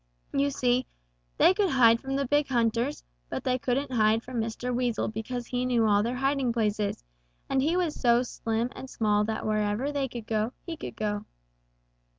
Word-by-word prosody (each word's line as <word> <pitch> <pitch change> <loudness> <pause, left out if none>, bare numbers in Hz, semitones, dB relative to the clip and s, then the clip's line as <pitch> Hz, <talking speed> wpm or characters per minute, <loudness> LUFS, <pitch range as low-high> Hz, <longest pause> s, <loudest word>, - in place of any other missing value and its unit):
You 280 +1 +2
see, 250 -2 +1 0.5
they 365 - +6
could 395 -1 +1
hide 230 -5 +5
from 270 +1 -4
the 275 0 0
big 290 +3 +2
hunters, 230 - 0 0.3
but - - -4
they 255 0 +1
couldn't 265 +3 -1
hide 220 -1 +3
from 245 -2 -3
Mr. 230 +3 -3
Weasel 245 -2 0
because 230 +3 -4
he 250 +1 -2
knew 245 -3 +2
all 205 -1 +4
their 235 +4 -1
hiding 270 -1 +1
places, 210 - -1 0.4
and 270 -1 +1
he 320 +6 +1
was 345 -4 0
so 240 -3 +3
slim 230 0 -2
and 265 - -8
small 210 -3 +1
that 220 0 -3
wherever 215 +5 0
they 280 -2 -1
could 235 -3 -7
go, 220 +2 -1
he 335 - -4
could - - -7
go. 210 -1 -2
245 Hz, 185 wpm, -28 LUFS, 220-265 Hz, 0.5 s, they